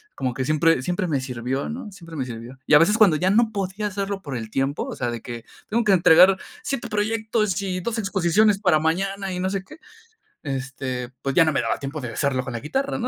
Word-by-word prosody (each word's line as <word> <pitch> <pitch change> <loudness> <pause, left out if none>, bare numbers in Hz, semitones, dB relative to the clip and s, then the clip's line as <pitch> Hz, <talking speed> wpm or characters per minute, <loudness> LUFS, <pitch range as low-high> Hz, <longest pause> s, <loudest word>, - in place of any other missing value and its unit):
como 130 -2 -2
que 130 - -2
siempre 155 0 +3
siempre 180 +6 -1
me 145 -5 0
sirvió, 130 +1 -3
¿no? 230 -2 -6
Siempre 165 -4 -11
me 130 - -2
sirvió. 120 +1 -8
Y - - +1
a - - +9
veces 210 +7 +4
cuando 200 -8 +6
ya 180 +4 +1
no 220 +3 +3
podía 200 +1 -2
hacerlo 200 0 -3
por 140 -7 -6
el 110 -1 -6
tiempo, 135 +4 -1
o - - -6
sea, 120 - -2
de 115 - -5
que 120 -1 -7 0.3
tengo 230 +2 +1
que 205 - +5
entregar 180 +1 +6 0.2
7 245 - -3
proyectos 215 -2 0
y 185 -2 -2
2 230 +5 -3
exposiciones 195 +1 +2
para 180 -7 +3
mañana 195 +5 -1
y 180 - -3
no 185 +1 0
sé 195 -1 -3
qué, 310 - -14 0.7
este, 135 -3 -4
pues 135 - -2
ya 165 - +5
no 155 - +1
me - - +1
daba - - -1
tiempo 140 +2 -5
de 120 -3 -5
hacerlo 135 0 0
con 130 - -6
la 120 - -3
guitarra, 265 - -2
¿no? 245 - -1
175 Hz, 240 wpm, -23 LUFS, 135-200 Hz, 0.7 s, a